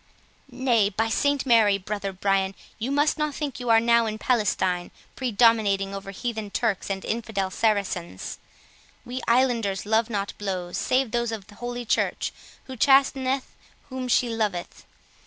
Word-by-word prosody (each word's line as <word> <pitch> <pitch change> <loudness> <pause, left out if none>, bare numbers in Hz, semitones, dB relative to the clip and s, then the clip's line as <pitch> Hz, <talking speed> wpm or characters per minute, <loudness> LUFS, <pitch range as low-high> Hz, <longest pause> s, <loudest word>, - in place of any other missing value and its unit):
"Nay, 245 -5 +2
by 225 +3 -1
St 285 +4 +1
Mary, 220 -5 +5
brother 200 0 -4
Brian, 195 0 0 0.2
you 230 +4 -2
must 290 +2 +2
not 300 -2 -1
think 290 -5 -4
you 245 -1 -4
are 225 0 +7
now 235 0 +3
in 215 0 -3
Palestine, 190 -6 0 0.3
predominating 215 -5 +2
over 195 0 -6
heathen 220 +1 -4
Turks 210 -1 -1
and 195 -1 -3
infidel 215 -4 -2
Saracens; 195 - -1 0.7
we 250 +1 -5
islanders 235 -6 +2
love 220 +2 +2
not 200 -3 -2
blows, 185 -3 -3
save 255 -2 +1
those 235 -1 0
of 215 -3 -6
holy 240 +3 -6
Church, - - 0 0.3
who 260 - -8
chasteneth 270 +1 +2 0.3
whom 260 -1 -4
she 245 0 +3
loveth. 215 -6 -3
225 Hz, 145 wpm, -25 LUFS, 200-245 Hz, 0.7 s, are